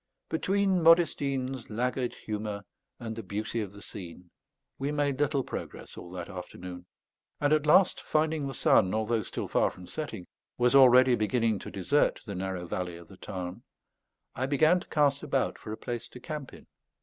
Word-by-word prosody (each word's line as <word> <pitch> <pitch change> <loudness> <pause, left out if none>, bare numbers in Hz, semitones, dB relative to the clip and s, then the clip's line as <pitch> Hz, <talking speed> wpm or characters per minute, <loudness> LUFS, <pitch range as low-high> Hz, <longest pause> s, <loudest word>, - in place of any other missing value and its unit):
Between 190 +2 +1
Modestine's 140 -6 +3
laggard 125 +3 -1
humour 105 -1 -4 0.4
and 115 -2 -5
the 115 - -5
beauty 110 +3 -3
of 100 -3 -5
the 100 0 -13
scene, 90 -3 -10 0.5
we 140 +2 -1
made 145 -2 0
little 145 -2 +1
progress - - -7
all 85 - -9
that 90 -2 -5
afternoon; 90 -1 -8 0.5
and 145 +1 +3
at 155 -1 +2
last 180 +4 +5
finding 155 -2 0
the 135 - -5
sun, 95 -2 +4
although 110 +1 +1
still - - -4
far - - +2
from 90 - -12
setting, 115 - -5 0.3
was 125 0 +3
already 130 -1 +7
beginning 115 -1 +1
to - - -8
desert 140 +10 +1
the 105 - -5
narrow 95 -1 -3
valley 90 0 -4
of 85 -1 -14
the 95 - -13
Tarn, 90 -3 -6 0.7
I 130 - -2
began 155 +5 +4
to - - -12
cast 140 -2 +2
about 135 -3 -1
for 110 - -8
a 110 - -4
place 120 0 -5
to 125 - -12
camp 150 +1 -6
in. - - -14
120 Hz, 175 wpm, -29 LUFS, 100-145 Hz, 0.7 s, already